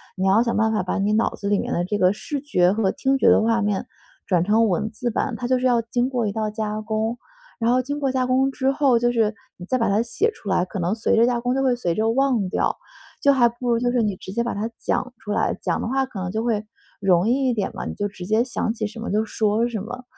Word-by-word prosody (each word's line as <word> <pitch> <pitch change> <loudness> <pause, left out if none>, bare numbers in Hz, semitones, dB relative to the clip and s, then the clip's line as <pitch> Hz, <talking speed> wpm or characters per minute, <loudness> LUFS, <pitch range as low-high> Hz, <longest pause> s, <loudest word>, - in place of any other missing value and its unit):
你 190 0 0
要 215 +5 +4
想 235 - -1
办 220 0 +2
法 215 -4 0
把 185 - -2
你 205 +2 +1
脑 220 - +1
子 200 - -4
里 205 - +3
面 - - -2
的 175 - 0
这 205 +3 -2
个 185 +1 +3
视 285 +6 -5
觉 185 -11 +2
和 205 -2 +1
听 270 0 0
觉 - - +2
的 - - +6
画 230 0 +2
面 205 -2 -1 0.4
转 175 -3 +2
成 215 +2 +3
文 210 +5 -1
字 240 +2 -3
版。 235 +2 -2
它 245 0 -4
就 255 0 +2
是 255 - -2
要 240 -2 +3
经 240 +2 -1
过 245 -5 -1
一 - - -1
道 215 0 -2
加 215 0 -3
工， 220 +2 -2 0.4
然 230 +1 +1
后 255 - +3
经 285 +3 -4
过 270 -2 0
加 255 -1 0
工 265 +1 +2
之 265 0 0
后， 270 -4 +3
就 240 0 +2
是 225 -2 +1 0.2
你 175 - -9
再 255 +5 0
把 230 - +1
它 210 +3 +2
写 415 - 0
出 215 - -14
来， 190 -2 +2
可 190 +1 -6
能 175 +4 0
随 225 +1 +1
着 230 +1 +5
加 240 -1 +1
工， 250 +1 0
就 270 - +1
会 255 -2 +3
随 175 -8 -2
着 220 +1 +1
忘 255 -6 +1
掉。 - - 0 0.5
就 280 0 +6
还 240 -3 +4
不 240 +1 -5
如 230 - +2
就 245 0 +1
是 245 -2 +2
你 205 -3 -1
直 190 - -9
接 235 +3 0
把 235 - -2
它 215 +3 -3
讲 250 - -1
出 210 - -6
来， - - 0
讲 - - -1
的 - - -3
话 265 +2 +1
可 210 -7 -7
能 180 0 -3
就 220 +2 -2
会 220 -3 0 0.4
容 185 0 +3
易 260 +2 +2
一 - - +1
点 205 - -1
嘛。 - - -6
你 - - -4
就 205 - -1
直 185 -3 -9
接 220 +2 +3
想 240 -3 -2
起 220 -2 -3
什 225 +2 -10
么 230 - -5
就 215 +2 +1
说 215 +2 +1
什 225 -4 -4
么。 250 +4 -7
225 Hz, 310 characters per minute, -23 LUFS, 210-250 Hz, 0.5 s, 的